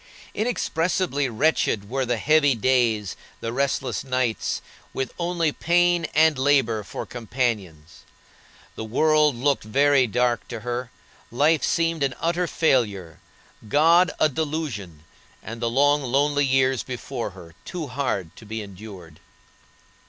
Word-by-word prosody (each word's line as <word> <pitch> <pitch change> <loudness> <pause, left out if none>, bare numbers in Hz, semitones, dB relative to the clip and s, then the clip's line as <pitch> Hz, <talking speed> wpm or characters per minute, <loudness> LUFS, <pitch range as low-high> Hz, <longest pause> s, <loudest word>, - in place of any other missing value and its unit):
Inexpressibly 180 - -1
wretched 115 -5 +1
were 130 +2 -2
the 120 -1 0
dreary 150 -3 +4
days, 115 -4 +1 0.2
the 115 0 -4
restless 135 0 -1
nights, 130 -4 -1 0.3
with 130 - -3
only 170 -2 0
pain 175 +1 +2
and 155 -2 +4
labor 130 -6 +2
for - - -6
companions. 105 - -4 0.8
The - - -5
world 150 +5 +3
looked 140 +3 0
very 135 +4 +3
dark 120 +1 0
to 115 -2 -7
her, 120 +1 -4 0.4
life 150 +6 +2
seemed 165 -1 0
an 135 -2 0
utter 170 +1 0
failure, 105 - 0 0.5
God 165 - +5
a 155 - +5
delusion, 140 - -4 0.4
and 115 +1 -8
the 115 - 0
long, 145 +4 +3
lonely 140 +2 +1
years 130 -1 +2
before 125 -1 -5
her 85 -2 -12
too 175 - -5
hard 125 - -3
to - - -13
be 110 0 -4
endured. 95 -5 -11
130 Hz, 130 wpm, -24 LUFS, 115-150 Hz, 0.8 s, God